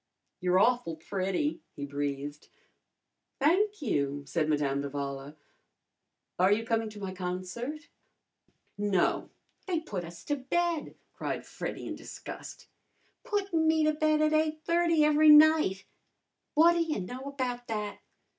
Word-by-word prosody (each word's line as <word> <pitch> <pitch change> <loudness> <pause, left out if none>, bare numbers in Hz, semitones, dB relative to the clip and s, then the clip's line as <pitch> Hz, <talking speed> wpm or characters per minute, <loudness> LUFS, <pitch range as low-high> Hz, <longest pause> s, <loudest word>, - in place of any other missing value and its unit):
"You're 180 0 +2
awful 235 -5 +2
pretty," 195 - -2
he 140 - -5
breathed. 145 +1 -4 0.9
"Thank 375 +6 +2
you," 145 - -1
said 155 +1 -1
Madame 140 -2 +1
d'Avala. 140 0 -5 1.0
"Are 185 +2 +5
you 225 +2 +2
coming 225 -1 0
to 210 -1 -10
my 190 -2 -5
concert?" 185 - -5 0.9
"No, 205 -3 +1 0.4
they 345 -4 0
put 195 - -5
us 170 0 -10
to 290 - -1
bed!" 330 +4 -1 0.2
cried - - -4
Freddy - - -6
in - - -4
disgust. - - -9 0.6
"Puttin' 395 -9 0
me 315 0 +3
to 310 0 +3
bed 310 0 +2
at 305 - +3
8:30 315 +1 +2
every 305 +1 +5
night! 300 -11 +6 0.7
What 330 +3 +7
ta 340 - 0
y' 325 -2 0
know 245 +8 -6
about 255 -3 -3
that! 210 -2 -3
240 Hz, 130 wpm, -29 LUFS, -, 1.0 s, What